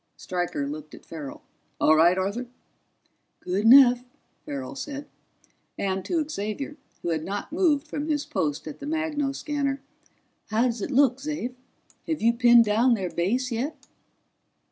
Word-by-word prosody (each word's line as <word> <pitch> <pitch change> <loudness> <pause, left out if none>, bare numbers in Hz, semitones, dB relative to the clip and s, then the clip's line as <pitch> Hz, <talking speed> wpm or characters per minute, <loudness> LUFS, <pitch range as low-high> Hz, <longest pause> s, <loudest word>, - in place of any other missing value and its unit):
Stryker 175 -5 -2
looked 155 +1 -7
at - - -16
Farrell. 150 -4 -8 0.4
"All 155 - +5
right, 170 +3 +5
Arthur?" 200 +7 -2 0.9
"Good 190 +4 -1
enough," 250 0 +8 0.4
Farrell 135 -2 -5
said. 280 - -6 0.7
And 190 -1 -1
to 320 -4 0
Xavier, 275 +3 -4 0.3
who 175 - -1
had 160 -2 -1
not 200 - -5
moved 320 -4 +2
from 295 0 -4
his 295 -2 0
post 150 -2 -2
at 155 - -7
the 285 - -7
magnoscanner: 290 -2 -1 0.7
"How 220 +2 +1
does 235 -3 -1
it - - -3
look, 265 -2 +4
Xav? 295 -3 -4 0.5
Have 320 -2 -1
you 230 +1 +3
pinned 240 -1 +6
down 230 +4 +3
their 190 -4 -3
base 245 +9 0
yet?" 250 +7 -3
240 Hz, 145 wpm, -26 LUFS, 185-285 Hz, 0.9 s, enough